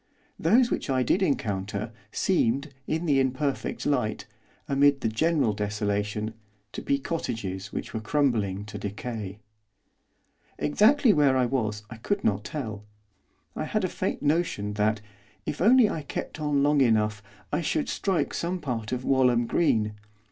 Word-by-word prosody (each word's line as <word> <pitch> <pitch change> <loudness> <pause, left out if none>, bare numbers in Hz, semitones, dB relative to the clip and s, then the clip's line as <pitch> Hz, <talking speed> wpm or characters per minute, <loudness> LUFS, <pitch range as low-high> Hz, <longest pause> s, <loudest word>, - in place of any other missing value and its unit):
Those 235 +9 +4
which - - -2
I 130 -1 +2
did 180 - +2
encounter, 105 - -1 0.2
seemed, 140 -5 +1
in 160 +2 -1
the 140 -4 +3
imperfect 135 +2 -1
light, 110 -7 0 0.4
amid 140 0 +3
the - - +1
general 140 +1 +1
desolation, 105 +1 -2 0.4
to - - -6
be 140 - +1
cottages 100 - -4
which - - -5
were 110 - -2
crumbling 110 -6 0
to 105 -1 -7
decay. 105 0 -5 1.2
Exactly 220 - +4
where 140 -4 +4
I 125 - +3
was 110 -5 -1
I 115 - -7
could 200 - -2
not 105 -1 +1
tell. 110 -5 -5 0.7
I - - -2
had - - -1
a - - +2
faint - - -3
notion 145 -10 0
that, 105 +1 +1 0.4
if 150 - -4
I - - +3
only 245 0 +7 0.2
kept - - -5
on 145 -2 +1
long 145 0 +4
enough, 105 -4 +2 0.3
I 150 - +1
should 155 -1 0
strike 190 -4 0
some 180 +2 -2
part 120 -8 -4
of 125 0 -3
Walham 125 -3 +3
Green. 110 -7 +1
125 Hz, 150 wpm, -27 LUFS, 105-150 Hz, 1.2 s, only